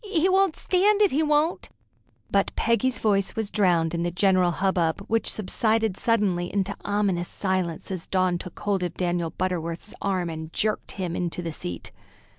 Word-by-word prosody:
He 370 -4 +1
won't 380 -2 +3
stand 400 +3 +2
it, 405 - +3
he 290 - +2
won't." 305 +2 +1 0.6
But - - +2
Peggy's 250 +2 +1
voice 200 -3 +1
was 220 -2 -2
drowned 175 -5 +2
in 170 - -1
the 175 - 0
general 185 0 +3
hubbub, 175 -1 0
which 225 +2 0
subsided 220 0 0
suddenly 195 -6 +1
into 200 0 -1
ominous 200 -4 0
silence 185 -3 -2
as 185 -3 -5
Dawn 185 -2 +1
took 180 - -9
hold 200 -2 0
of 175 -2 -3
Daniel 175 -2 -1
Butterworth's 170 +1 -3
arm 185 -3 0
and 160 0 -7
jerked 215 +4 -1
him 180 -3 -3
into 175 0 -3
the 165 -2 -4
seat. 90 - -6
190 Hz, 170 wpm, -25 LUFS, 175-220 Hz, 0.6 s, won't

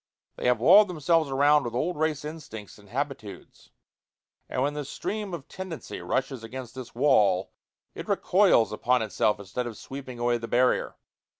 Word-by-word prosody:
They - - -2
have 125 -2 +3
walled 205 - +7
themselves 165 -2 +1
around 145 +2 +4
with 120 -1 -5
old 170 +8 -1
race 155 -1 -1
instincts 115 - -9
and 100 -1 -18
habitudes, 135 -4 -6 0.8
and 130 - -1
when 145 +1 0
the 150 0 -4
stream 205 +8 -4
of 165 -6 -7
tendency 185 -4 -7
rushes 130 -2 -2
against 125 +1 -8
this 130 -3 -9
wall, 105 -9 +3 0.4
it - - -8
recoils 110 -2 +3
upon 125 +2 +1
itself 105 0 0
instead 100 +5 -4
of 115 -3 -7
sweeping 130 -2 -8
away 120 0 +1
the 115 - -6
barrier. 125 +2 +1
130 Hz, 165 wpm, -27 LUFS, 115-150 Hz, 0.8 s, walled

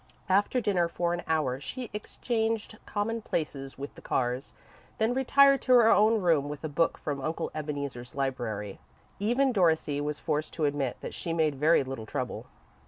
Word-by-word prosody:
After 200 +6 +3
dinner, 195 -6 +1
for 170 0 -1
an 175 - -2
hour, 150 -5 0
she 250 - -6
exchanged 220 0 -2
commonplaces 205 -11 -3
with 140 +2 -6
the - - -14
Carrs, 125 +1 -1 0.4
then 220 +2 +2
retired 275 +1 +5
to 255 - +3
her 235 -2 +7
own 220 +2 +5
room 160 -5 +2
with 150 +1 -7
a - - -1
book 160 +3 +1
from 145 -2 -4
Uncle 155 +4 -3
Ebeneezer's 140 -5 -5
library. 115 -7 -3 0.4
Even 245 +6 +2
Dorothy 160 - +2
was 150 0 -2
forced 155 -1 -2
to 155 - 0
admit 140 -3 -1
that - - -6
she 165 - -4
made 160 -2 +2
very 150 +3 +3
little 130 -4 -6
trouble. - - -4
160 Hz, 170 wpm, -29 LUFS, 140-215 Hz, 0.4 s, her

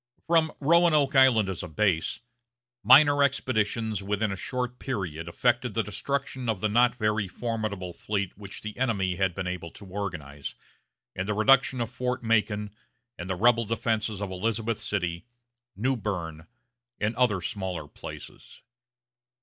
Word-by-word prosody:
From 160 -2 +3
Roanoke 155 -2 +4
Island 130 -6 +6
as 95 -3 -4
a 90 - -6
base, 90 +4 0 0.6
minor 145 +5 +7
expeditions 110 -6 0
within 105 +1 -1
a - - -2
short 125 +4 -4
period 90 - -4
effected 120 +5 0
the 115 - +2
destruction 130 +4 -3
of 110 -4 0
the 110 - +1
not 120 +3 +4
very 105 -3 0
formidable 105 -3 -4
fleet 100 -1 -3
which 100 -1 -9
the 105 -1 -6
enemy 100 -8 0
had 95 -3 +1
been 95 - -3
able 90 -2 -4
to 100 - -11
organize, 85 -8 -5 0.6
and 95 +1 -3
the 105 - 0
reduction 130 +3 +4
of 120 0 -2
Fort 125 -1 -2
Macon 105 -2 +1 0.5
and 90 +2 -6
the 95 - 0
rebel 115 +4 +4
defenses 110 -2 -1
of 95 - -4
Elizabeth 110 +3 -1
City, 90 -3 -3 0.5
New 130 +6 +1
Berne, 85 -8 -4 0.5
and 105 +3 0
other 120 -6 +2
smaller 90 -5 -4
places. - - -11
105 Hz, 150 wpm, -27 LUFS, 95-125 Hz, 0.6 s, minor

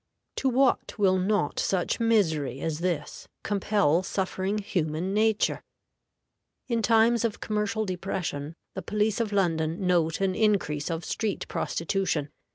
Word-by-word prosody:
To 270 - +1
what 260 0 +2
will 190 -3 +3
not 190 -5 0
such 185 +3 0
misery 160 - +1
as 155 +1 -2
this 175 -2 -3 0.2
compel 200 -5 +2
suffering 190 +1 -2
human 180 -2 -2
nature? 215 0 +2 1.1
In 235 -3 0
times 225 +1 +4
of 230 -3 -1
commercial 215 +1 -1
depression 175 -5 -4 0.2
the - - -5
police 210 0 0
of 225 -3 -1
London 170 -2 0
note 170 -3 +2
an 195 -1 +1
increase 185 -9 +1
of 165 0 -3
street 215 -3 -2
prostitution. 165 -4 -1
190 Hz, 130 wpm, -27 LUFS, 165-215 Hz, 1.1 s, times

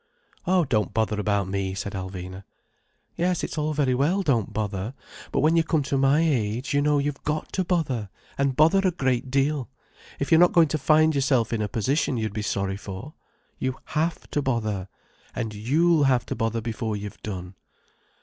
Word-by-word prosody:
"Oh, 180 -2 +3
don't 110 -7 0
bother 110 -2 +1
about 100 -2 0
me," 95 -1 -2
said 100 +1 -4
Alvina. 95 0 -6 0.7
"Yes, 180 0 0
it's - - -3
all 155 0 -1
very 145 -4 +1
well, 160 +10 +1
don't 120 - +1
bother. 105 +2 -3 0.4
But - - +1
when 155 +3 +4
you 165 - +4
come 160 -2 +1
to 140 0 -2
my 135 +3 +4
age, 125 -4 0
you 145 - +3
know 150 0 +3
you've 145 -1 -2
got 150 +1 -3
to 190 - +1
bother, 140 - -1 0.3
and 140 -1 0
bother 160 +7 +5
a 195 -1 +3
great 130 -6 -1
deal, 135 -1 0 0.5
if 140 - -3
you're 160 - +7
not 175 0 +6
going 165 -3 +5
to 155 - -1
find 155 +3 +4
yourself 130 -5 +1
in 110 - 0
a 105 - 0
position 130 +5 0
you'd 110 -2 -2
be 105 - -3
sorry 100 -2 -1
for. 100 +9 -8 0.5
You 130 0 -2 0.2
have 160 +2 -1
to 145 - 0
bother. 110 -8 -1 0.5
And 110 -3 -3
you'll 150 +9 +3
have 125 -2 +2
to - - -4
bother 115 0 -1
before 110 -1 -3
you've 105 0 -8
done." 90 -3 -6
130 Hz, 190 wpm, -25 LUFS, 105-150 Hz, 0.7 s, you're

